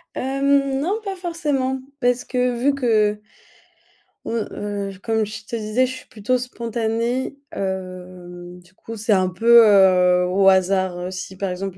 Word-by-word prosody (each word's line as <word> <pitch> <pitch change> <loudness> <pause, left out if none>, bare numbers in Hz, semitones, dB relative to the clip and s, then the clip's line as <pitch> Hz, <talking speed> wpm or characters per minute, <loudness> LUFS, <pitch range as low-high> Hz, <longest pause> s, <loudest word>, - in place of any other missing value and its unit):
Hem, 275 +1 +1
non 385 +9 -1
pas 395 -2 -5
forcément 295 -7 -2 0.2
parce 245 -1 +1
que 250 -1 -1
vu 275 +4 +2
que 215 -6 +1 1.0
mmh, - - -5 0.2
heu, 200 -2 -5
comme 220 -1 0
je 215 +1 -9
te 235 - -5
disais, 220 +3 0
je 255 - -4
suis - - -14
plutôt 225 +4 -1
spontanée, 235 +1 -3 0.2
heu, 180 -2 -6
du 180 +1 -24
coup 225 +4 -10
c'est 220 +1 +1
un 185 -2 +2
peu, 230 +5 +6
heu, 180 -3 +5
au 195 +1 +4
hasard, 190 -1 +2
heu, 180 +1 -5
si 185 0 -7
par 195 0 -2
exemple 185 +1 -5
215 Hz, 160 wpm, -21 LUFS, 190-255 Hz, 1.0 s, peu